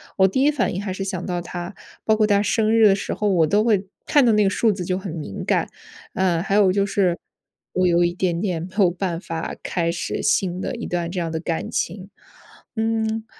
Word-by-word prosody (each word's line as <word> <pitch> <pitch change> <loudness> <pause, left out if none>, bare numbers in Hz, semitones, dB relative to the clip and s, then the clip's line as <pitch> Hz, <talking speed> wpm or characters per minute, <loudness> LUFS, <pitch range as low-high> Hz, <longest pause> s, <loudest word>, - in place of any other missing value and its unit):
我 190 -1 +5
第 260 +8 0
一 290 - +5
反 290 - 0
应 190 - -3
还 190 -2 -4
是 195 - -4
想 185 -2 -4
到 175 -1 -2
他， 175 +2 -7 0.3
包 220 - +4
括 215 -1 +3
他 205 -1 +3
生 215 +1 +1
日 225 -2 +6
的 195 - +5
时 195 - -4
候 210 - -1
我 165 -5 +3
都 210 +6 +2
会 200 -4 +2 0.2
看 285 -4 +4
到 230 - +5
那 210 -1 +3
个 - - +3
数 220 +2 +2
字 185 -3 -4
就 185 0 -1
很 190 -3 -6
敏 150 - -6
感。 - - +1 0.5
呃， 180 -3 +1
还 195 +2 -1
有 200 -3 +5
就 200 +1 +1
是 190 -3 +1 0.6
我 185 0 +2
有 175 0 +4
一 175 - 0
点 175 -2 -1
点 180 -5 -2
没 185 - -7
有 190 -4 +5
办 175 -1 -3
法 165 -3 -5
开 170 -2 -1
始 175 - -3
新 190 -4 +1
的 - - -3
一 - - -5
段 170 -1 -2
这 180 - -3
样 165 -1 -2
的 160 0 -3
感 165 -2 -3
情。 190 +2 -3 0.7
嗯， 220 0 -1
190 Hz, 255 characters per minute, -22 LUFS, 175-210 Hz, 0.7 s, 日